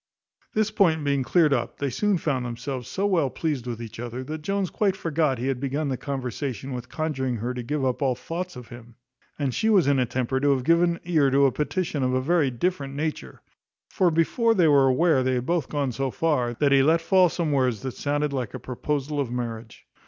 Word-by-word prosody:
This 215 0 +1
point 170 -7 +2
being 140 -1 +1
cleared 155 +2 +3
up, 120 -3 -2
they 140 -2 -2
soon 200 - +1
found 140 -6 -1
themselves 125 +1 -5
so 195 - -2
well 170 -9 +2
pleased 140 -4 -3
with 120 -2 -4
each 115 -1 -8
other, 120 +2 -5
that 155 +3 -6
Jones 195 +2 -1
quite 200 -3 +1
forgot 155 -7 0
he 120 - -4
had 135 -2 -1
begun 140 +2 -2
the 130 - -1
conversation 130 -2 -4
with 125 0 -6
conjuring 135 -6 -2
her 120 +3 -3
to 125 - -4
give 140 +3 -2
up 130 +1 -1
all 130 -3 +2
thoughts 175 +6 -5
of 125 -2 -10
him; 120 -1 -12 0.4
and 140 -4 -1
she 220 - +1
was 195 -6 +5
in 140 -1 +3
a 125 - +1
temper 130 +2 -1
to 145 +1 +2
have 130 - -3
given 170 +3 +3
ear 155 -6 +3
to 140 +1 +4
a 135 - +4
petition 150 +1 -2
of 130 0 +1
a - - +2
very 150 +1 +2
different 140 +1 -2
nature; 155 +1 -4 0.5
for 185 -3 +3
before 225 +8 +2
they 175 -5 +4
were 140 -3 +5
aware 135 +2 +3
they 130 0 +1
had 125 0 -2
both 170 0 -1
gone 145 -3 -1
so 135 +2 -2
far, 125 -5 0
that 140 +3 +2
he 135 -1 +6
let 160 +4 +4
fall 180 +2 +4
some 165 -2 -2
words 130 -5 +1
that 130 -2 -4
sounded 145 +1 -1
like 125 -5 -3
a - - -5
proposal 145 +3 -3
of 135 -4 -1
marriage. 115 -2 -6
140 Hz, 225 wpm, -25 LUFS, 125-165 Hz, 0.5 s, he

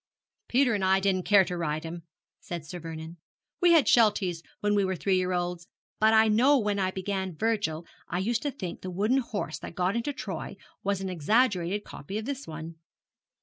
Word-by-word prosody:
'Peter 255 -1 +3
and 200 -3 -1
I 190 +1 +4
didn't 190 -2 0
care 200 -2 +6
to 180 - -4
ride 155 -2 -2
him,' 170 +1 -6 0.4
said 170 -3 -6
Sir 175 +4 -7
Vernon. 165 0 -8 0.4
'We 350 -1 +6
had 320 -5 +6
Shelties 205 -7 +3 0.2
when 205 0 +1
we 205 -1 +3
were 190 0 0
three 190 +2 +1
year 185 0 +1
olds; 175 -1 -2 0.3
but 220 +1 +5
I 220 0 +6
know 250 +7 +5
when 210 -4 0
I 190 -1 +1
began 190 -1 -3
Virgil 205 -7 -1 0.2
I 175 - -2
used 220 +5 0
to 290 - -1
think 185 -10 -6
the 185 - -5
wooden 210 +9 +1
horse 210 -10 -4
that - - -9
got 185 +3 0
into 235 +5 -1
Troy 275 - -6 0.3
was 200 -1 0
an 190 - -3
exaggerated 195 - +1
copy 195 +8 -7
of 220 - -4
this 280 +1 -5
one. 160 +1 -7
190 Hz, 200 wpm, -28 LUFS, 175-220 Hz, 0.4 s, care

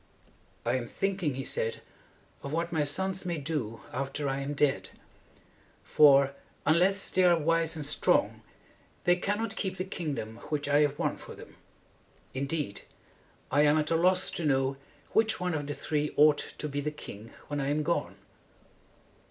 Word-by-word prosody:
"I 120 +2 +2
am 120 -2 -4
thinking," 185 -6 -1
he 135 - -4
said, 115 -2 -2 0.6
"of 140 - -6
what 165 +2 -1
my 160 -3 +1
sons 190 +6 -1
may 175 -2 -2
do 135 -8 -3
after 140 +2 -3
I 135 0 -1
am 140 +1 -3
dead. 145 -1 +1 0.9
For, 140 -2 +6 0.3
unless 185 +5 +3
they 185 - +3
are 175 -1 +6
wise 165 +1 +1
and 155 -2 -4
strong, 145 - +2 0.6
they 175 - +5
cannot 205 +4 -2
keep 190 -3 -3
the 185 - -1
kingdom 145 - -4
which 145 -1 -1
I 145 0 +4
have 145 -1 +2
won - - -1
for - - -10
them. - - -13 0.8
Indeed, 140 -4 -3 0.7
I 145 +2 +4
am 150 +1 +5
at 155 +1 0
a - - +4
loss 185 +2 +2
to 170 - -4
know 135 -2 +2 0.4
which 220 -2 +2
one 180 -1 -1
of 145 -2 -3
the 145 - -3
three 150 -1 -2
ought 150 0 +4
to 150 - -4
be 145 0 -3
the 150 - -1
king 115 -7 -10 0.2
when 145 -1 -2
I 135 - -1
am 150 +1 +1
gone." 170 +3 -1
150 Hz, 170 wpm, -29 LUFS, 140-175 Hz, 0.9 s, For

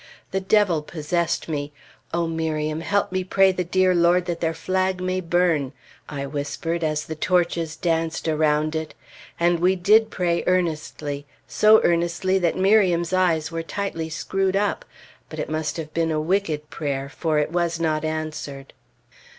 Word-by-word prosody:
The 190 - -1
Devil 190 -4 +3
possessed 165 +2 -2
me. 145 -2 -3 0.4
"O 170 0 0
Miriam, 160 -1 -2
help 200 +4 0
me 185 0 -1
pray 190 +1 +4
the 185 -1 -2
dear 185 +1 +2
Lord 175 +1 +3
that 175 -2 -3
their 165 -1 0
flag 185 +2 -1
may 185 0 -1
burn!" 165 -6 +1 0.4
I 140 -2 -4
whispered 150 +4 -3
as 155 -1 -1
the 160 - -5
torches 170 -1 0
danced 165 -1 -1
around 155 0 +1
it. 160 -1 -4 0.4
And 170 0 +2
we 180 +2 +3
did 215 +5 +4
pray 175 -4 0
earnestly 155 -5 -1 0.2
so 215 +1 +5
earnestly 175 +3 +1
that 170 -2 0
Miriam's 185 -3 +3
eyes 170 -4 +2
were 165 0 -3
tightly 165 -2 -4
screwed 190 +4 -1
up; 205 - 0 0.4
but - - -8
it - - -4
must 155 +1 -2
have 155 -2 -6
been 165 -1 +1
a 155 -1 0
wicked 155 -3 -1
prayer, 140 -3 -3
for 155 +2 -1
it 150 +1 0
was 170 -1 0
not 155 -2 0
answered. 155 -3 -5
170 Hz, 160 wpm, -23 LUFS, 155-185 Hz, 0.4 s, so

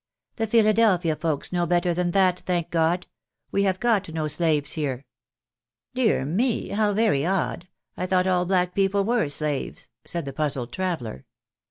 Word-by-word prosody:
" - - -56
The 225 -1 -1
Philadelphia 215 -7 +3
folks 155 -2 -2
know 175 -1 +1
better 175 +1 +2
than 175 +1 0
that, 185 0 +3
thank 175 -2 -2
God! 170 +2 +1 0.5
We 200 0 +1
have 185 -1 0
got 220 -6 +1
no 155 -1 -2
slaves 155 -2 +1
here." 140 -4 -3 0.4
" 120 +1 -65
Dear 245 - +1
me, 220 - 0
how 205 0 +1
very 210 -11 +2
odd, 180 0 -1 0.3
I 185 - -3
thought 185 0 +2
all 180 -1 +1
black 180 -1 +1
people 195 0 +1
were 230 -9 +1
slaves? 145 -1 -3
" - - -54
said 170 -3 -3
the 140 - -6
puzzled 135 -4 -1
traveller. 160 - -3
175 Hz, 175 wpm, -24 LUFS, 155-195 Hz, 0.5 s, Philadelphia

